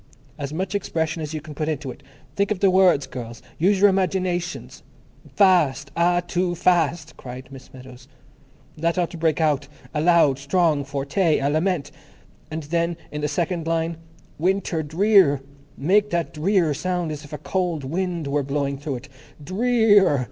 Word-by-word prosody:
As 140 -1 -5
much 185 +5 -3
expression 165 -4 -2
as 155 0 -5
you 155 - -4
can 155 +1 -10
put 155 +1 -2
into 140 -4 -3
it. - - -13 0.3
Think 200 0 +1
of 210 -3 -1
the 195 -1 +4
words, 185 -6 +4
girls. 120 -3 -8 0.2
Use 190 +4 +3
your 205 - +7
imaginations. 185 -2 -2 0.5
Fast! 150 -9 +3
Ah, 175 +1 +3
too 175 0 -1
Fast," 165 -2 +1
cried 125 0 -9
Miss 135 -1 -12
Meadows. 130 -1 -13 0.7
"That 165 +3 -1
ought 175 -2 0
to 170 - -8
break 160 -1 +1
out—a 150 0 -2
loud, 165 -5 +4
strong 150 0 +1
forte—a 140 +2 0
lament. 155 -2 0 0.6
And 160 0 -5
then 170 +2 -1
in 150 - -4
the 150 - 0
second 170 +1 -2
line, 165 0 -1 0.4
Winter 185 -1 0
Drear, 165 -1 +4 0.4
make 200 +8 +2
that 170 -3 -2
Drear 170 0 +2
sound 175 +1 -2
as 150 0 -6
if 145 - -13
a 150 - -4
cold 175 -5 -2
wind 170 +3 -2
were 140 +1 0
blowing 140 0 -2
through 145 -1 -4
it. 130 +3 -9 0.3
_Dre 195 +10 -2 0.2
ear! 195 -9 +5
160 Hz, 165 wpm, -23 LUFS, 145-180 Hz, 0.7 s, your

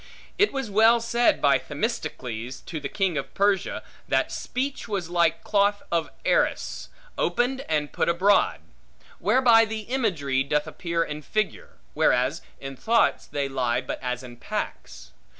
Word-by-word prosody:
It 410 - +4
was 270 -6 -4
well 225 +3 +5
said 235 +1 +2
by 140 -2 +4
Themistocles, 130 - -4
to 160 - -6
the 140 -1 -5
king 190 -7 0
of 140 - -8
Persia, 200 -1 +1 0.2
That - - +1
speech 265 +1 -3
was 190 -6 -3
like 170 -2 +2
cloth 205 0 +2
of 165 -2 0 0.2
Arras, - - 0 0.3
opened 260 +2 +1
and 150 -2 0
put - - +1
abroad; 185 +4 +3 0.6
whereby 240 -3 +5
the 220 0 -4
imagery 185 - 0
doth 150 +2 0
appear 170 -2 -2
in 150 -1 -6
figure; 215 +6 -3 0.2
whereas - - +2 0.2
in 135 0 -7
thoughts 230 - +2
they 140 -1 -2
lie 125 -3 0
but 130 - -5
as 125 -1 -3
in 120 -1 -11
packs. - - -6
175 Hz, 150 wpm, -25 LUFS, 140-225 Hz, 0.6 s, well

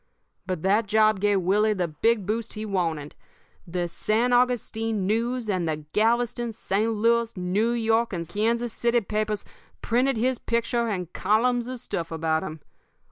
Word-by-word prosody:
"But 185 -4 -3
that 205 +3 +2
job 215 -1 +3
gave 205 -1 +2
Willie 210 +4 +2
the 180 -3 0
big 205 +7 +1
boost 220 +3 -2
he 215 0 -5
wanted. 165 -7 -2 0.5
The 175 0 -2
San 225 +8 0
Augustine 225 -4 +1
News 230 +3 0
and 185 -5 0
the 155 -1 -4
Galveston, 235 +1 +1
St. 215 +1 0
Louis, 230 0 +1
New 185 +5 +1
York, 230 0 +1
and 170 -3 -4
Kansas 230 +4 0
City 235 0 +2
papers 215 0 -2 0.4
printed 250 +2 +2
his 250 +2 0
picture 235 0 0
and 180 -5 -3
columns 235 +4 +1
of 255 0 -5
stuff 170 -9 -4
about 160 0 0
him. 155 0 -7
215 Hz, 155 wpm, -25 LUFS, 185-235 Hz, 0.5 s, job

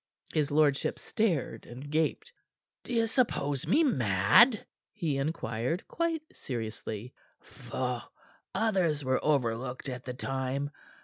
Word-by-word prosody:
His 150 -2 +2
lordship 145 -2 +2
stared 190 - -1
and 130 +4 -8
gaped. 160 - 0 0.5
"Do - - -8
you 230 -1 +3
suppose 150 - 0
me 300 - +5
mad?" 125 - +5 0.3
he 165 -9 -1
inquired, 140 - -2
quite 330 -2 -1
seriously. 110 -1 -5 0.3
"Pho! 125 -2 -4 0.5
Others 185 -10 +2
were 130 0 +1
overlooked 130 -2 0
at 125 -1 -6
the 125 -1 -4
time. 135 +2 -2
140 Hz, 115 wpm, -30 LUFS, 125-190 Hz, 0.5 s, me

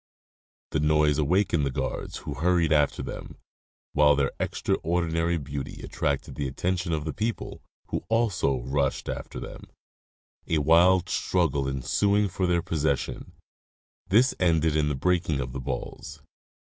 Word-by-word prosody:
The 75 - +1
noise 75 0 +3
awakened 85 +1 +2
the 70 - +1
guards, 65 - -4
who - - -3
hurried 85 -1 +2
after 75 -2 +2
them, - - -7 0.6
while 75 -1 +5
their 70 -1 +1
extraordinary 85 0 0
beauty 70 -2 -6
attracted 70 -1 -2
the 70 - -3
attention 90 +6 -2
of 75 -2 -1
the 80 - -3
people, 115 +1 -3 0.3
who - - -2
also 100 - +1
rushed 70 +2 -1
after - - -5
them, - - -9 0.8
a 80 - +1
wild 85 +4 +5
struggle 80 -8 0
ensuing 100 +10 +1
for 90 0 -1
their 85 -1 +1
possession; 75 -5 -2 0.7
this 115 +8 +4
ended 80 -3 +2
in 75 -1 +2
the 75 - -1
breaking 85 -1 +1
of 60 -2 -4
the 65 - -4
balls. 70 +4 -6
80 Hz, 140 wpm, -26 LUFS, 70-90 Hz, 0.8 s, while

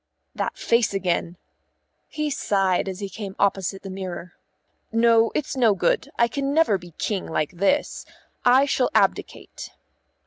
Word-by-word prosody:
"That - - -3
face 235 -3 +1
again," 175 -2 -1 0.7
he 305 -1 -3
sighed 195 -7 0
as 190 +1 -7
he 200 - -3
came 195 0 -7
opposite 195 -1 0
the 195 - -7
mirror. 185 -2 -6 0.6
"No, 230 0 +4
it's 285 - -2
no 230 -6 +3
good; 175 -2 0
I 235 - +4
can 275 +3 -2
never 315 -12 +3
be 175 -2 -14
King 200 -4 -2
like 155 -2 -1
this. 200 +11 0 0.4
I 255 +3 +5
shall 265 -3 +1
abdicate." - - -1
200 Hz, 145 wpm, -23 LUFS, 185-240 Hz, 0.7 s, I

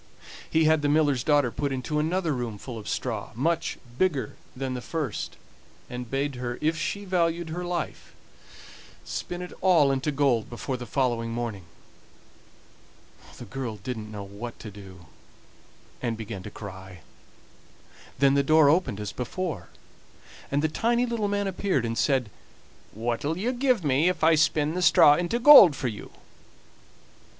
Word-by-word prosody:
He 160 - +3
had 155 -1 +4
the 145 - +1
miller's 145 -4 +2
daughter 145 -5 +3
put 140 +2 -2
into 135 +3 -2
another 165 +1 0
room 120 -5 -4
full 115 +2 -8
of 105 - -8
straw, 110 -5 -3
much 165 +7 -1 0.2
bigger 175 -8 0 0.2
than 130 0 -3
the 125 - -4
first, 150 -5 -4 0.5
and 125 -1 -6
bade 135 0 -2
her, 120 -1 -4
if 160 +2 +1
she 200 +6 -3
valued 170 -2 0
her 175 +3 -4
life, 175 -2 -5 0.9
spin 175 0 -5
it 180 - -9
all 170 -7 +4
into 135 +2 -1
gold 135 -6 +1
before 125 +2 -4
the 120 -1 -7
following 120 -4 0
morning. 115 -5 -4 1.7
The 120 - -9
girl 120 0 -5
didn't 110 0 -6
know 105 -1 -6
what 100 +4 -8
to 110 - -8
do, 95 -3 -13 1.0
and 115 -3 -2
began 110 -3 -6
to 105 - -8
cry; 95 -4 -10 1.2
then 140 0 +4
the 140 - +4
door 155 0 +5
opened 150 - 0
as 105 -1 -4
before, 125 - -4 0.8
and 145 +2 0
the - - +3
tiny 235 +9 +1
little 230 -3 -1
man 205 0 -1
appeared 190 - -1
and 115 0 -2
said: 130 -5 +1 0.6
"What'll 120 +8 -2
you 225 +7 -1
give 250 -5 +1
me 145 +4 +3
if 180 -3 -3
I 165 +1 +6
spin 150 0 +2
the 180 - -2
straw 170 -4 +7
into 175 +8 0
gold 240 - +9
for 125 - -2
you?" 105 - -8
140 Hz, 160 wpm, -26 LUFS, 120-165 Hz, 1.7 s, gold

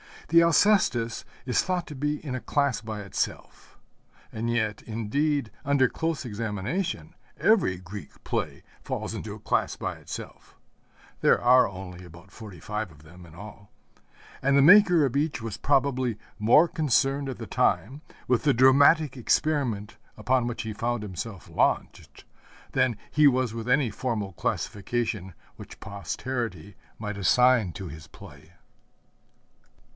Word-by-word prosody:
The 170 +1 +6
Alcestis 170 - +2 0.2
is 125 - +2
thought 180 -2 -2
to 150 - -8
be 150 +2 -2
in 135 - -4
a 130 - -2
class 140 -3 0
by 110 -2 -6
itself. 100 - -5 0.5
And 115 +1 -3
yet, 110 -3 -1
indeed, 115 +4 -1
under 140 -2 +3
close 160 -4 -3
examination, 115 - -3 0.2
every 200 - +3
Greek 90 -2 -11
play - - -3 0.2
falls - - -4
into - - -6
a - - -12
class - - 0
by - - -4
itself - - -10 0.6
(there - - +4
are 125 +1 +5
only 90 -2 -9
about 85 +3 -15
forty 105 -7 -11
five 105 -1 -4
of 75 -1 -18
them 90 +3 -14
in 80 - -16
all), 100 +1 -12 0.7
and 140 +1 +3
the - - +6
maker 180 -2 +7
of 135 0 -1
each 150 +1 0
was 110 -2 -5
probably 130 -4 +1 0.2
more 120 +10 +5
concerned 140 -4 +1
at 130 - -5
the - - -7
time 135 +8 0 0.3
with 125 -2 +2
the 145 -2 +4
dramatic 135 +3 +5
experiment 125 -5 0 0.2
upon 125 +2 +1
which 120 - -4
he 110 -1 -5
found 115 +1 -2
himself 100 0 -7
launched - - -1 0.5
than 120 -4 +1
he 150 0 +5
was 130 -4 +2
with 115 0 -6
any 125 -2 +2
formal 105 -4 -3
classification 100 +1 -3 0.2
which - - -12
posterity 100 -2 -5 0.2
might 105 -2 -5
assign 125 0 +4
to 95 -2 -7
his 75 0 -10
play. - - -15
120 Hz, 145 wpm, -26 LUFS, 105-140 Hz, 0.7 s, maker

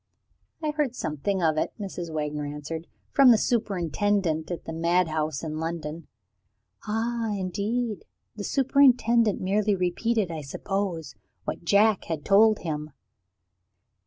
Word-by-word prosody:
"I 305 - +1
heard 295 -5 -1
something 175 - -2
of 155 -1 +2
it," - - -2
Mrs. 180 -4 -5
Wagner 150 -1 -2
answered, 150 +3 -6 0.2
"from 275 -2 +6
the 230 - +7
superintendent 195 -6 0
at 175 - -5
the 160 - -5
madhouse 160 -3 0
in 155 -1 -4
London." 165 0 -4 0.8
"Ah, 225 +1 -1
indeed? 205 +4 -2 0.3
The 210 - -6
superintendent 245 -4 +3
merely 205 +2 +1
repeated, 190 +2 0
I 160 -2 -4
suppose, 175 +3 -3 0.3
what - - -4
Jack 205 +3 +4
had 160 -3 -4
told 215 +2 +5
him?" 150 -2 -3
185 Hz, 125 wpm, -26 LUFS, 160-220 Hz, 0.8 s, the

